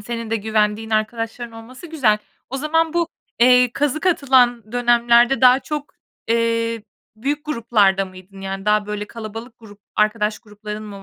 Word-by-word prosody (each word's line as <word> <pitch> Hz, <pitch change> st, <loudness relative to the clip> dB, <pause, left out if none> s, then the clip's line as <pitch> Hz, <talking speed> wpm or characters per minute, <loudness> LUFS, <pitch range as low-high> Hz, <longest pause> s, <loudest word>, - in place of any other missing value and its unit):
senin 230 Hz, +1 st, -6 dB
de 225 Hz, -, +1 dB
güvendiğin 215 Hz, 0 st, -1 dB
arkadaşların 225 Hz, +2 st, -2 dB
olması 230 Hz, +7 st, -11 dB
güzel. 265 Hz, -10 st, +2 dB, 0.3 s
O 270 Hz, -, -3 dB
zaman 320 Hz, +3 st, 0 dB
bu, 340 Hz, -1 st, 0 dB, 0.3 s
eee, 250 Hz, 0 st, +6 dB
kazık 295 Hz, +6 st, -1 dB
atılan 250 Hz, -, +2 dB
dönemlerde 240 Hz, +1 st, +3 dB
daha 255 Hz, +1 st, +6 dB
çok, 300 Hz, +1 st, -5 dB, 0.4 s
eee, 230 Hz, -1 st, 0 dB, 0.3 s
büyük 285 Hz, +6 st, -3 dB
gruplarda 220 Hz, -9 st, +2 dB
mıydın? 185 Hz, +1 st, -13 dB
Yani 195 Hz, 0 st, -5 dB
daha, 210 Hz, 0 st, +2 dB
böyle, 210 Hz, 0 st, -4 dB
kalabalık 225 Hz, +2 st, -9 dB
grup 210 Hz, -2 st, -15 dB, 0.2 s
arkadaş 215 Hz, 0 st, +1 dB
grupların 210 Hz, 0 st, -8 dB
mı 200 Hz, -2 st, -10 dB
230 Hz, 145 wpm, -20 LUFS, 210-250 Hz, 0.4 s, eee